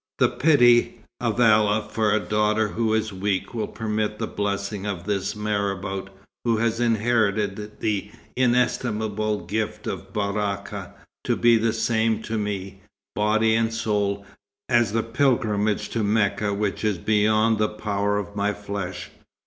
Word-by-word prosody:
The -, -, +4 dB
pity 120 Hz, -6 st, +4 dB, 0.2 s
of 120 Hz, -1 st, -1 dB
Allah 110 Hz, -2 st, +4 dB
for 110 Hz, -2 st, 0 dB
a 110 Hz, -, +3 dB
daughter 105 Hz, +1 st, +1 dB
who 110 Hz, 0 st, -1 dB
is 110 Hz, -1 st, -1 dB
weak 95 Hz, +2 st, -2 dB
will 115 Hz, -, -2 dB
permit 105 Hz, -1 st, -2 dB
the 115 Hz, -, -2 dB
blessing 100 Hz, -1 st, -3 dB
of 95 Hz, -4 st, -3 dB
this 100 Hz, +1 st, -2 dB
marabout, 100 Hz, -2 st, -2 dB, 0.3 s
who 115 Hz, -2 st, +2 dB
has 115 Hz, +1 st, 0 dB
inherited 110 Hz, -3 st, 0 dB
the 105 Hz, -3 st, -1 dB, 0.3 s
inestimable 110 Hz, -5 st, 0 dB
gift 105 Hz, +2 st, -3 dB
of 95 Hz, +1 st, -5 dB
Baraka, 100 Hz, -1 st, -3 dB, 0.3 s
to -, -, +2 dB
be 120 Hz, 0 st, +5 dB
the 115 Hz, 0 st, +2 dB
same 110 Hz, 0 st, 0 dB
to 110 Hz, 0 st, -2 dB
me, 100 Hz, -2 st, -4 dB, 0.3 s
body 110 Hz, +1 st, +2 dB
and 115 Hz, 0 st, +2 dB
soul, 105 Hz, -3 st, -1 dB, 0.4 s
as 120 Hz, -4 st, +3 dB
the 115 Hz, +1 st, 0 dB
pilgrimage 115 Hz, -4 st, +1 dB
to 115 Hz, -, -1 dB
Mecca 105 Hz, 0 st, +1 dB
which 100 Hz, 0 st, -2 dB
is 105 Hz, -3 st, +1 dB
beyond 110 Hz, +3 st, +2 dB
the 105 Hz, -, +2 dB
power 105 Hz, -1 st, -1 dB
of 100 Hz, 0 st, -5 dB
my 105 Hz, 0 st, 0 dB
flesh. 100 Hz, -2 st, -5 dB
105 Hz, 145 wpm, -24 LUFS, 100-110 Hz, 0.4 s, be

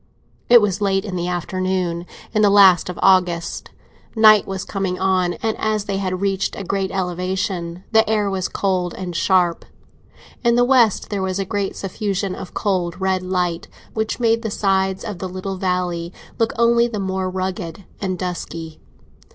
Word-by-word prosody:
It 240 Hz, -1 st, +8 dB
was 205 Hz, -1 st, 0 dB
late 195 Hz, -1 st, +1 dB
in 195 Hz, -3 st, -5 dB
the 175 Hz, 0 st, -2 dB
afternoon, 180 Hz, 0 st, -2 dB, 0.3 s
in 215 Hz, -, +2 dB
the 205 Hz, -, +5 dB
last 195 Hz, -4 st, +6 dB
of 180 Hz, -, -5 dB
August; 180 Hz, -3 st, +2 dB, 0.5 s
night 215 Hz, -2 st, +6 dB
was 190 Hz, -1 st, -4 dB
coming 190 Hz, -2 st, -2 dB
on, 185 Hz, -2 st, +1 dB
and, 220 Hz, -1 st, 0 dB
as 215 Hz, -1 st, 0 dB
they 200 Hz, -1 st, -2 dB
had 185 Hz, -1 st, -2 dB
reached 195 Hz, -1 st, 0 dB
a -, -, -5 dB
great 195 Hz, +1 st, -1 dB
elevation, 180 Hz, -1 st, -3 dB
the 220 Hz, -1 st, +4 dB
air 210 Hz, -2 st, +1 dB
was 190 Hz, -2 st, -1 dB
cold 185 Hz, -3 st, -1 dB
and 180 Hz, -2 st, -6 dB
sharp. 175 Hz, -1 st, +2 dB, 0.8 s
In 235 Hz, -1 st, +4 dB
the 245 Hz, 0 st, +4 dB
west 245 Hz, -6 st, +3 dB
there 200 Hz, -2 st, -1 dB
was 190 Hz, 0 st, -1 dB
a 195 Hz, -, -1 dB
great 200 Hz, 0 st, -2 dB
suffusion 195 Hz, -1 st, -3 dB
of 185 Hz, -, -9 dB
cold, 185 Hz, -4 st, -1 dB
red 190 Hz, -1 st, 0 dB
light, 180 Hz, -2 st, -2 dB, 0.3 s
which 220 Hz, +2 st, -2 dB
made 230 Hz, -1 st, +2 dB
the 225 Hz, -, -3 dB
sides 190 Hz, -2 st, 0 dB
of 205 Hz, -5 st, -5 dB
the 185 Hz, -, -4 dB
little 185 Hz, +1 st, -5 dB
valley 180 Hz, -2 st, -1 dB, 0.3 s
look 225 Hz, -1 st, +2 dB
only 235 Hz, 0 st, +4 dB
the 220 Hz, -3 st, -4 dB
more 190 Hz, -1 st, -2 dB
rugged 185 Hz, -1 st, -4 dB, 0.2 s
and 185 Hz, -2 st, -2 dB
dusky. 165 Hz, -3 st, -6 dB
190 Hz, 175 wpm, -20 LUFS, 180-205 Hz, 0.8 s, It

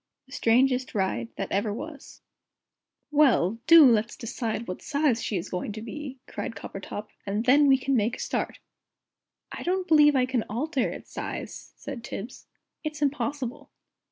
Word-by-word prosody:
THE 265 Hz, -, -23 dB
STRANGEST 255 Hz, +2 st, +2 dB
RIDE 190 Hz, -, 0 dB
THAT -, -, -4 dB
EVER 205 Hz, +2 st, 0 dB
WAS 285 Hz, +6 st, -8 dB, 0.9 s
"Well, 250 Hz, -, +4 dB
do 330 Hz, -2 st, +10 dB
let's 230 Hz, -2 st, +3 dB
decide 230 Hz, -1 st, -4 dB
what 180 Hz, -, -5 dB
size 285 Hz, -5 st, +1 dB
she 205 Hz, -, -1 dB
is 175 Hz, -, -4 dB
going 180 Hz, +3 st, -3 dB
to 215 Hz, -, -7 dB
be," 270 Hz, +3 st, -7 dB
cried 230 Hz, -, -5 dB
Coppertop, 205 Hz, +2 st, -7 dB
"and 205 Hz, +3 st, -2 dB
then 285 Hz, +3 st, +6 dB
we 270 Hz, -1 st, +6 dB
can 270 Hz, +1 st, 0 dB
make 225 Hz, +1 st, +1 dB
a -, -, -12 dB
start." -, -, -2 dB, 0.9 s
"I -, -, -6 dB
don't 370 Hz, +1 st, -1 dB
believe 295 Hz, -2 st, +6 dB
it 255 Hz, -1 st, +2 dB
can 255 Hz, -3 st, +1 dB
alter 260 Hz, +3 st, -1 dB
its -, -, -9 dB
size," -, -, -6 dB
said 275 Hz, -5 st, -7 dB
Tibbs. 235 Hz, +1 st, -7 dB, 0.4 s
"It's 305 Hz, -1 st, -3 dB
impossible." 275 Hz, -2 st, -2 dB
255 Hz, 160 wpm, -27 LUFS, 220-290 Hz, 0.9 s, do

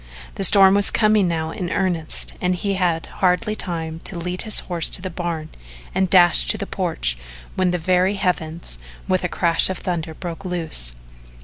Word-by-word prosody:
The -, -, -2 dB
storm 195 Hz, 0 st, +7 dB
was 200 Hz, 0 st, +3 dB
coming 215 Hz, -3 st, +2 dB
now 160 Hz, -1 st, -2 dB
in 180 Hz, -3 st, -5 dB
earnest 175 Hz, -4 st, 0 dB
and 180 Hz, 0 st, +1 dB
he 200 Hz, +2 st, -2 dB
had 175 Hz, -4 st, 0 dB, 0.2 s
hardly 190 Hz, +4 st, +1 dB
time 165 Hz, -5 st, -4 dB
to 185 Hz, -, -3 dB
lead 180 Hz, +2 st, -1 dB
his 215 Hz, -2 st, +3 dB
horse 170 Hz, -3 st, +1 dB
to -, -, +4 dB
the 185 Hz, 0 st, -6 dB
barn 165 Hz, -3 st, -4 dB, 0.4 s
and 190 Hz, 0 st, 0 dB
dash 175 Hz, -, +5 dB
to -, -, +2 dB
the -, -, -4 dB
porch -, -, -2 dB, 0.3 s
when 185 Hz, -1 st, +1 dB
the 180 Hz, -, 0 dB
very 185 Hz, +3 st, +1 dB
heavens, 170 Hz, -, -3 dB, 0.3 s
with 185 Hz, 0 st, 0 dB
a 180 Hz, -, -1 dB
crash 170 Hz, 0 st, +1 dB
of 190 Hz, -, -3 dB
thunder, 165 Hz, -3 st, -4 dB
broke 175 Hz, +2 st, -7 dB
loose. 165 Hz, -, -1 dB
180 Hz, 185 wpm, -21 LUFS, 165-190 Hz, 0.4 s, storm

